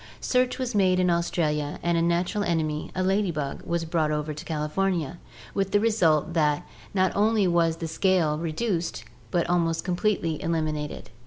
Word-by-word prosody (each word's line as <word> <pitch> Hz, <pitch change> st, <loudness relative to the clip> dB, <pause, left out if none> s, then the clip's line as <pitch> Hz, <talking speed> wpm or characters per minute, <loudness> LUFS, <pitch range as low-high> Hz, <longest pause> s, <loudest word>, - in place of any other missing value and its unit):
Search 250 Hz, 0 st, +1 dB
was 255 Hz, -2 st, -3 dB
made 185 Hz, -3 st, +3 dB
in 180 Hz, -1 st, +3 dB
Australia, 150 Hz, -3 st, 0 dB
and 170 Hz, 0 st, +2 dB
a 165 Hz, -, +2 dB
natural 175 Hz, +5 st, +1 dB
enemy, 155 Hz, -4 st, -1 dB
a 185 Hz, -, 0 dB
lady 195 Hz, +1 st, +2 dB
bug, 150 Hz, -4 st, -3 dB
was 170 Hz, -1 st, -1 dB
brought 160 Hz, -2 st, 0 dB
over 150 Hz, 0 st, -2 dB
to 150 Hz, -, -9 dB
California, 165 Hz, +1 st, -1 dB, 0.3 s
with 195 Hz, -1 st, 0 dB
the 205 Hz, -, +5 dB
result 175 Hz, -8 st, +2 dB
that 150 Hz, -3 st, +1 dB, 0.3 s
not 190 Hz, -1 st, +1 dB
only 210 Hz, -1 st, +3 dB
was 170 Hz, -2 st, +2 dB
the 165 Hz, -, -4 dB
scale 160 Hz, -3 st, +1 dB
reduced 170 Hz, -, -2 dB, 0.3 s
but 175 Hz, -1 st, 0 dB
almost 165 Hz, -2 st, +1 dB
completely 175 Hz, -3 st, 0 dB
eliminated. 155 Hz, -5 st, -2 dB
170 Hz, 165 wpm, -26 LUFS, 155-190 Hz, 0.3 s, the